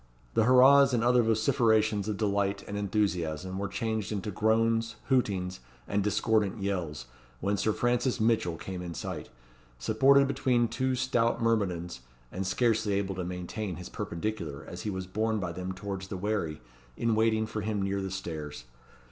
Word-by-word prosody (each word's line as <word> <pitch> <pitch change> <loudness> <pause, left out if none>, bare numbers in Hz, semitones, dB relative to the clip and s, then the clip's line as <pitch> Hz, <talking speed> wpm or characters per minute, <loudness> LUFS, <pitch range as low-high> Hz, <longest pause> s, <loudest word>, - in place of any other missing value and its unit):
The 110 - +3
hurrahs 130 +2 +7
and 115 - +1
other 125 0 +5
vociferations 110 -2 +2
of 105 - -2
delight 100 -1 0
and 100 - -5
enthusiasm 95 -4 -1
were 100 - -1
changed 110 -3 -2
into 105 0 -3
groans, 115 +2 +1
hootings, 95 -8 +1 0.3
and 100 0 0
discordant 105 0 +1
yells, 90 -8 -3 0.3
when 100 +2 0
Sir 100 +2 +1
Francis 120 +2 0
Mitchell 110 -7 +1
came 95 0 -6
in 85 -2 -6
sight, - - -5 0.5
supported 135 - +4
between 125 -3 +2
two 130 +3 -1
stout 120 -2 +1
myrmidons, 95 - 0 0.3
and 95 +1 -3
scarcely 110 0 +1
able 100 -1 0
to 90 -1 -4
maintain 90 +2 -4
his 90 - -8
perpendicular 85 -5 -4
as - - -7
he 105 - -3
was 95 -2 -4
borne 110 +4 -1
by 90 -3 -3
them 90 +2 -5
towards 95 0 -5
the 95 - -5
wherry 95 -6 -2 0.4
in 115 -1 +1
waiting 110 0 +2
for 110 -1 -4
him 105 0 -2
near 100 0 -1
the 95 - -3
stairs. 80 -7 -6
105 Hz, 165 wpm, -29 LUFS, 95-115 Hz, 0.5 s, hurrahs